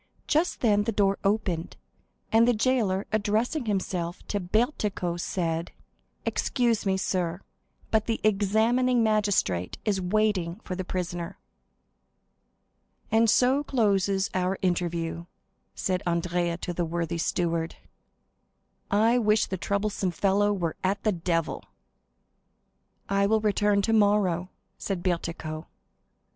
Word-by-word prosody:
Just 320 +4 +1
then 205 -3 +3
the 230 - 0
door 200 -2 +1
opened, 195 -5 -1 0.5
and 230 +1 +5
the 245 - +4
jailer, 215 -5 +1
addressing 220 +7 0
himself 180 -3 -2
to 205 - 0
Bertuccio, 200 - -1
said: 170 -1 -2 0.5
"Excuse 235 -5 0
me, 190 0 +2
sir, 180 -2 -1 0.5
but 220 -1 +2
the 225 - 0
examining 220 +4 +3
magistrate 205 - +1
is 200 -3 +1
waiting 185 -3 +1
for 185 - -5
the 185 - -3
prisoner." 175 0 -4 1.7
"And 225 0 +4
so 260 +6 +3
closes 200 -7 +1
our 185 +1 0
interview," 170 -2 -1 0.5
said 185 -1 -1
Andrea 170 0 0
to 175 - -4
the 175 - -1
worthy 170 0 -2
steward; 165 -1 -1 1.1
"I 225 +4 +3
wish 215 -1 +3
the 190 - -4
troublesome 200 +1 -1
fellow 200 +3 +2
were 175 -5 -2
at 195 +2 0
the 215 - +3
devil!" 165 -3 -1 1.4
"I 200 0 +2
will 220 +1 +3
return 205 -1 +2
tomorrow," 205 -5 +2 0.3
said 190 -3 -3
Bertuccio. 170 -3 -3
195 Hz, 115 wpm, -27 LUFS, 175-215 Hz, 1.7 s, and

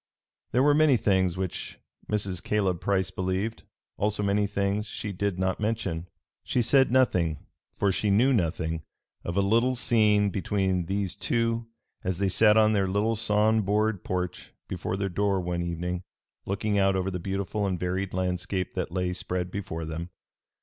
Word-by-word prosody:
There 125 +3 +3
were 145 +1 +5
many 150 -3 +5
things 95 -4 +2
which 95 -1 -4 0.3
Mrs. 100 -4 -1
Caleb 95 -5 0
Price 95 -2 +1
believed; 95 +4 -2 0.4
also 105 0 0
many 100 +1 +2
things 100 +1 -1
she 105 0 -4
did 100 0 -2
not 95 0 0
mention. 105 -6 -2 0.4
She 125 - +1
said 130 +2 +4
nothing, 90 - +2 0.3
for 100 -1 +1
she 105 +2 0
knew 120 +7 +4
nothing, 80 -5 0 0.4
of 85 +2 -3
a - - +5
little 115 +6 +2
scene 105 -4 +3
between 95 -2 0
these 95 -1 -1
two 115 +2 0 0.4
as 90 -1 -1
they 100 0 +1
sat 105 +3 +5
on 110 0 +5
their 100 -2 +2
little 105 +4 +1
sawn 110 0 +3
board 105 0 0
porch 90 -1 -3 0.2
before 95 - -3
their 100 0 -1
door 100 +1 +1
one 90 -1 -2
evening, 85 +1 -3 0.5
looking 100 +1 0
out 95 0 +3
over 95 +1 -1
the 90 - -3
beautiful 100 +2 -2
and 90 -2 -2
varied 95 +2 -2
landscape 90 0 -2
that - - -2
lay 90 0 -1
spread 90 0 -3
before 85 -5 -4
them. 80 +2 -5
100 Hz, 165 wpm, -27 LUFS, 90-105 Hz, 0.5 s, were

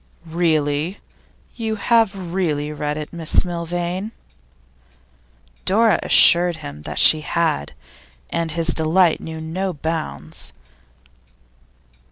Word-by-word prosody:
'Really? 160 0 0 0.6
You 220 -2 -3
have 200 -5 +1
really 150 -5 -1
read 150 0 -3
it, 150 +1 -7
Miss 165 +1 +1
Milvain?' 175 +3 -3 1.5
Dora 220 +2 +3
assured 175 0 +5
him 75 - -9
that 75 0 -7
she 155 - +6
had, 155 - -1 0.6
and 165 -1 -2
his 165 0 +1
delight 165 +2 +3
knew 160 0 -7
no 180 +4 -3
bounds. 160 - -5
165 Hz, 100 wpm, -20 LUFS, 155-185 Hz, 1.5 s, she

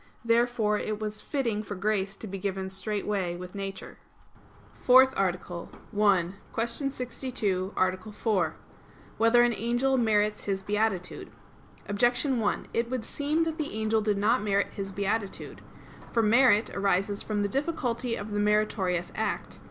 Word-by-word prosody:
Therefore 230 -2 +2
it 215 -1 -3
was 215 0 -4
fitting 235 -7 -1
for 205 -1 -6
grace 195 0 0
to 220 - -9
be 195 -1 -6
given 190 0 -3
straightway 195 -2 -2
with 180 +1 -8
nature. 195 -1 -6 0.8
_______________________ - - -22
FOURTH 260 +1 +7
ARTICLE 180 -2 -2 0.3
[I, 195 -4 +3 0.2
Q. 225 - +1 0.2
62, 245 -7 -2
Art. 185 0 +1
4] 210 -2 0 0.6
Whether 230 +2 +6
an 240 -1 +3
Angel 240 +4 +1
Merits 210 -3 +1
His 195 -1 -1
Beatitude? 205 -3 -1 0.6
Objection 245 +5 +2
1: 210 -2 -1
It 235 +1 0
would 250 -3 -3
seem 300 +3 0
that 325 0 -3
the 300 -6 -3
angel 220 0 +1
did 210 -1 +1
not 220 +5 +3
merit 200 -1 +1
his 195 -1 -5
beatitude. 200 +1 -3 0.5
For 230 - +2
merit 225 -1 +4
arises 200 0 +1
from 210 -1 -1
the - - +1
difficulty 250 -2 -1
of 205 +1 -6
the 205 - -1
meritorious 205 -4 +1
act. 220 - -3
210 Hz, 150 wpm, -28 LUFS, 195-235 Hz, 0.8 s, FOURTH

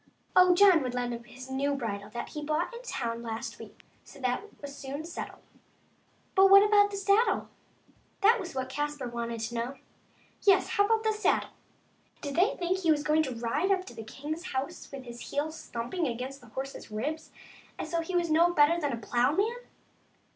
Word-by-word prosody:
Oh, 365 -1 +7
John 375 -4 +7
would 250 -2 -3
lend 245 -1 -1
him 235 - -6
the 255 +2 -10
new 280 +1 0
bridle 205 -5 -4
that 235 - -5
he 300 - -6
bought 310 +8 -1
in 470 - -7
the - - -16
town 230 - -3
last 225 -1 -5
week; - - -12 0.2
so - - -15
that 250 -1 0 0.2
was 280 -1 -8
soon 280 +3 -6
settled. 335 - -7 0.9
But 385 0 +7
how 390 - +8
about 410 -1 +5
the 400 - -5
saddle? 400 +4 +2 0.3
— - - -34
that 455 +4 +6
was 360 -7 -6
what 260 -1 -2
Caspar 295 0 -3
wanted 235 -1 -4
to 225 +2 -3
know 240 +3 -3 0.3
— - - -33
yes, 390 -2 +4
how 405 -3 +3
about 445 0 +2
the 440 0 +2
saddle? 425 0 +1 0.7
Did 285 -2 -5
they 370 +5 +3
think 360 +1 0
that - - -6
he 330 - +2
was 295 -2 +3
going 305 +1 +3
to 265 -5 -3
ride 260 +11 0
up 375 -1 +1
to - - -10
the 225 - -8
king's 295 +10 -6
house 265 +1 -4
with 275 -2 -7
his 240 -1 -9
heels 310 +2 -3
thumping 245 +9 -2
against 255 +3 -5
the 245 - -15
horse's 265 +4 -6
ribs 290 +9 -4 0.5
as - - -5
though 335 -1 +1
he 360 +2 -4
were 350 - +3
no 335 +1 +4
better 310 +3 +5
than 290 -3 0
a - - -2
ploughman 275 - +1
290 Hz, 210 wpm, -29 LUFS, 245-360 Hz, 0.9 s, how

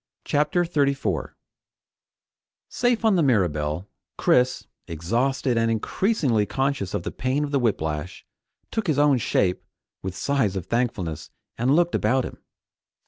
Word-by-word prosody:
CHAPTER 150 +4 +1
34 140 -5 -1 1.3
Safe 245 -2 +1
on 210 -4 +4
the - - +3
Mirabelle, 90 - +1 0.3
Chris, 125 +1 +2 0.2
exhausted 120 - 0
and 115 0 +2
increasingly 115 - +1
conscious 135 -5 -1
of - - -2
the - - -4
pain 130 +3 -1
of 145 - -3
the 140 - +2
whiplash, 80 - -2 0.5
took 220 -3 -2
his 155 -4 +1
own 145 -3 +4
shape 90 -4 0 0.4
with 95 0 -5
sighs 135 -9 0
of 95 -3 -3
thankfulness 95 - -2 0.3
and 130 +5 +2
looked 175 +1 +2
about 130 0 +2
him. - - -8
125 Hz, 135 wpm, -24 LUFS, 95-145 Hz, 1.3 s, on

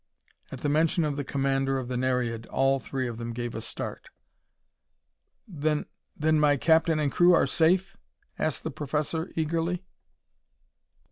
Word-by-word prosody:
At 130 - -7
the - - -1
mention 160 +3 +2
of 150 -2 -1
the 145 - -3
commander 135 0 0
of 130 -2 -4
the 125 - -3
Nereid, 125 -3 -1
all 135 0 +2
three 130 -1 -3
of 115 -1 -6
them 115 0 -4
gave 120 0 -4
a 115 - -5
start. 115 - -6 1.4
"Then 155 -4 -1 0.3
then 155 0 +2
my 145 -1 +4
captain 160 +2 +3
and 145 -2 +1
crew 175 +3 +5
are - - +4
safe?" 185 +4 +2 0.4
asked 155 -2 -1
the 160 - -3
professor, 150 +3 -2
eagerly. 165 +3 -1
145 Hz, 150 wpm, -27 LUFS, 130-160 Hz, 1.4 s, crew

